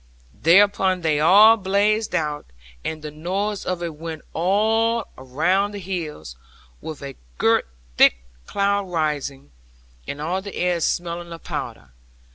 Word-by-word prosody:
'Thereupon 190 Hz, +1 st, +3 dB
they 155 Hz, -3 st, +1 dB
all 205 Hz, +8 st, +7 dB
blazed 210 Hz, +2 st, +1 dB
out, 150 Hz, -2 st, -2 dB, 0.4 s
and 155 Hz, -1 st, -5 dB
the 150 Hz, -, -6 dB
noise 190 Hz, +7 st, -3 dB
of 180 Hz, -1 st, -2 dB
it 170 Hz, -2 st, -4 dB
went 160 Hz, 0 st, -7 dB
all 220 Hz, +6 st, +1 dB
round 180 Hz, +11 st, 0 dB
the -, -, -5 dB
hills; 160 Hz, -, -6 dB, 0.5 s
with 155 Hz, -3 st, -7 dB
a 135 Hz, -1 st, -7 dB, 0.2 s
girt -, -, +2 dB, 0.3 s
thick -, -, +6 dB, 0.3 s
cloud 200 Hz, 0 st, 0 dB
arising, 150 Hz, -, -2 dB, 0.6 s
and 140 Hz, -, -5 dB
all 175 Hz, +5 st, -2 dB
the 200 Hz, 0 st, -8 dB
air 180 Hz, -1 st, 0 dB
smelling 170 Hz, +1 st, -2 dB
of 165 Hz, -1 st, -9 dB
powder. -, -, -6 dB
175 Hz, 135 wpm, -22 LUFS, 155-200 Hz, 0.6 s, all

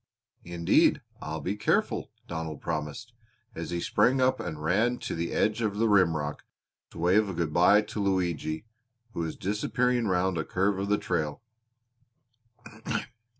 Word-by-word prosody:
"Indeed 85 Hz, -1 st, +3 dB, 0.2 s
I'll 80 Hz, +1 st, -4 dB
be 95 Hz, -, -2 dB
careful," 105 Hz, -, 0 dB, 0.2 s
Donald 80 Hz, -3 st, -5 dB
promised, 75 Hz, +10 st, -4 dB, 0.4 s
as 85 Hz, -5 st, -5 dB
he 85 Hz, -, -2 dB
sprang 130 Hz, +9 st, +2 dB
up 130 Hz, 0 st, +3 dB
and 85 Hz, -8 st, -5 dB
ran 110 Hz, +9 st, +2 dB
to -, -, -5 dB
the 85 Hz, +1 st, -2 dB
edge 110 Hz, +2 st, +1 dB
of 105 Hz, -3 st, -1 dB
the 115 Hz, +1 st, +3 dB
rimrock 80 Hz, -8 st, +2 dB, 0.5 s
to -, -, -14 dB
wave 95 Hz, +5 st, +3 dB
a 95 Hz, -, -4 dB
good 80 Hz, -2 st, -1 dB
bye 95 Hz, +5 st, +5 dB
to 105 Hz, -, -6 dB
Luigi, 90 Hz, -3 st, -1 dB, 0.5 s
who -, -, -5 dB
was 80 Hz, -1 st, -2 dB
disappearing 120 Hz, +4 st, 0 dB
round 90 Hz, -2 st, +1 dB
a -, -, 0 dB
curve 95 Hz, +3 st, 0 dB
of 100 Hz, +1 st, -2 dB
the 105 Hz, -, +3 dB
trail. 80 Hz, -2 st, -2 dB
95 Hz, 150 wpm, -28 LUFS, 80-105 Hz, 0.5 s, bye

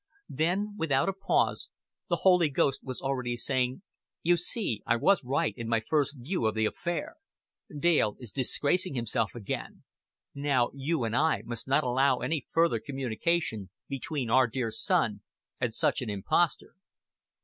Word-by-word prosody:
Thus, 160 Hz, +6 st, 0 dB, 0.2 s
without 145 Hz, +1 st, +2 dB
a -, -, -1 dB
pause, 195 Hz, +1 st, 0 dB, 0.4 s
the -, -, +3 dB
Holy 180 Hz, -4 st, +6 dB
Ghost 135 Hz, 0 st, +1 dB
was 130 Hz, -2 st, -5 dB
already 125 Hz, -3 st, -1 dB
saying, 130 Hz, -, 0 dB, 0.4 s
"You 175 Hz, +1 st, +4 dB
see 175 Hz, -, -2 dB
I 115 Hz, -, +4 dB
was 190 Hz, +10 st, +3 dB
right 140 Hz, +6 st, 0 dB
in 115 Hz, -2 st, -6 dB
my 115 Hz, 0 st, +2 dB
first 150 Hz, -2 st, +1 dB
view 130 Hz, 0 st, -1 dB
of 110 Hz, -, -1 dB
the 110 Hz, 0 st, +2 dB
affair. 170 Hz, -, -3 dB, 0.6 s
Dale 150 Hz, -10 st, +2 dB
is 120 Hz, -5 st, -7 dB
disgracing 145 Hz, -, +1 dB
himself 115 Hz, -2 st, -1 dB
again. 110 Hz, -5 st, -5 dB, 0.5 s
Now 140 Hz, -4 st, +1 dB
You 140 Hz, +1 st, -1 dB
and 115 Hz, 0 st, -1 dB
I 160 Hz, +4 st, +2 dB
must 120 Hz, +1 st, -4 dB
not 140 Hz, +3 st, +3 dB
allow 130 Hz, +1 st, +3 dB
any 140 Hz, +2 st, -2 dB
further 165 Hz, -8 st, +3 dB
communication 135 Hz, -, -2 dB, 0.2 s
between 135 Hz, -2 st, -3 dB
Our 130 Hz, +1 st, +5 dB
dear 115 Hz, -1 st, -2 dB
Son -, -, +1 dB, 0.4 s
and -, -, 0 dB
such -, -, +1 dB
an -, -, -4 dB
impostor." 105 Hz, -, 0 dB
135 Hz, 155 wpm, -29 LUFS, 120-160 Hz, 0.6 s, Holy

